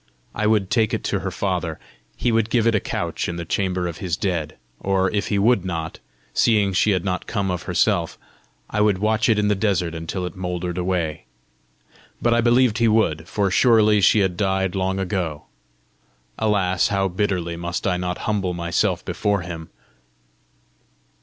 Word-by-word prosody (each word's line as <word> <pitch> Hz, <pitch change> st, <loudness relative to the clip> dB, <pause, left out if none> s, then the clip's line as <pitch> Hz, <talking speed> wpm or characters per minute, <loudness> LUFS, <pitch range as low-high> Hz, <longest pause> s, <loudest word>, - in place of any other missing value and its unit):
I 105 Hz, 0 st, 0 dB
would 105 Hz, -3 st, +1 dB
take 110 Hz, -3 st, +2 dB
it -, -, -5 dB
to -, -, -1 dB
her -, -, -3 dB
father: -, -, -2 dB, 0.4 s
he 120 Hz, -, +1 dB
would 115 Hz, -1 st, +1 dB
give 115 Hz, -2 st, +2 dB
it 115 Hz, -, +3 dB
a 105 Hz, -, +3 dB
couch -, -, -3 dB
in 85 Hz, -, -3 dB
the 85 Hz, 0 st, -5 dB
chamber 90 Hz, 0 st, -1 dB
of 85 Hz, -3 st, -5 dB
his 85 Hz, -3 st, -2 dB
dead! 85 Hz, -6 st, -2 dB, 0.2 s
or, 95 Hz, -1 st, +1 dB
if 100 Hz, -1 st, -1 dB
he 105 Hz, -, 0 dB
would 105 Hz, -1 st, +3 dB
not, 80 Hz, -3 st, -4 dB, 0.3 s
seeing 105 Hz, -4 st, +3 dB
she 95 Hz, -, +3 dB
had 95 Hz, -2 st, +1 dB
not 95 Hz, -1 st, -2 dB
come 100 Hz, -4 st, -1 dB
of 90 Hz, -2 st, -3 dB
herself, 90 Hz, -1 st, +1 dB, 0.5 s
I 105 Hz, -, -1 dB
would 105 Hz, -2 st, +3 dB
watch 110 Hz, +4 st, +1 dB
it 110 Hz, -, +4 dB
in 105 Hz, 0 st, +2 dB
the 105 Hz, -, +3 dB
desert 95 Hz, -5 st, 0 dB
until 80 Hz, +3 st, -4 dB
it 90 Hz, -, -6 dB
mouldered 90 Hz, -1 st, -3 dB
away! 90 Hz, -4 st, -2 dB, 0.9 s
But 120 Hz, -, +2 dB
I 120 Hz, -, +3 dB
believed 120 Hz, -1 st, +3 dB
he 115 Hz, -, +4 dB
would, 85 Hz, -8 st, +1 dB
for 100 Hz, 0 st, 0 dB
surely 110 Hz, -1 st, +4 dB
she 100 Hz, +2 st, +5 dB
had 95 Hz, -2 st, 0 dB
died 95 Hz, -2 st, 0 dB
long 95 Hz, 0 st, -1 dB
ago! 90 Hz, -6 st, -2 dB, 1.0 s
Alas, 95 Hz, -4 st, +2 dB
how 95 Hz, -1 st, +1 dB
bitterly 90 Hz, -3 st, -1 dB
must 85 Hz, +1 st, -4 dB
I 90 Hz, -2 st, +1 dB
not 90 Hz, 0 st, -3 dB
humble 100 Hz, -4 st, -1 dB
myself 85 Hz, -1 st, 0 dB
before 100 Hz, -2 st, 0 dB
him! 85 Hz, -2 st, -7 dB
95 Hz, 180 wpm, -22 LUFS, 90-105 Hz, 1.0 s, she